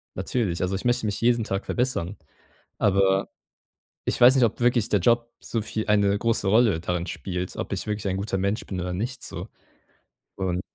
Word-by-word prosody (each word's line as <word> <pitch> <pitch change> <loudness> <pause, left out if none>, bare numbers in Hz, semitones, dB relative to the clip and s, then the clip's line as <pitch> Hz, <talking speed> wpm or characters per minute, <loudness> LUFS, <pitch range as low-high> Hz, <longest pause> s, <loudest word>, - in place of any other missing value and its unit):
natürlich. 100 -9 -1
Also, 90 +1 -1
ich 95 - -4
möchte 120 -1 +2
mich 105 -1 -2
jeden 120 -1 +3
Tag 95 0 -3
verbessern. 120 -7 -1 0.6
Aber 95 -1 +3 0.8
ich - - 0
weiß 125 +2 +8
nicht, 130 - +4
ob 115 - 0
wirklich 120 -2 +2
der 105 - +3
Job 120 +4 +2
so 115 - -3
viel 110 0 -3
eine 100 -1 +3
große 115 -2 +1
Rolle 110 -4 +4
darin 90 +1 -2
spielt, 90 -1 -4
ob - - -4
ich - - -4
wirklich 105 -1 -2
ein 95 - -1
guter 95 0 -2
Mensch 100 +4 -1
bin 95 -2 -4
oder 90 0 -3
nicht, 120 +7 -4
so. - - -6 0.9
Und 90 -1 -1
105 Hz, 190 wpm, -25 LUFS, 95-115 Hz, 0.9 s, weiß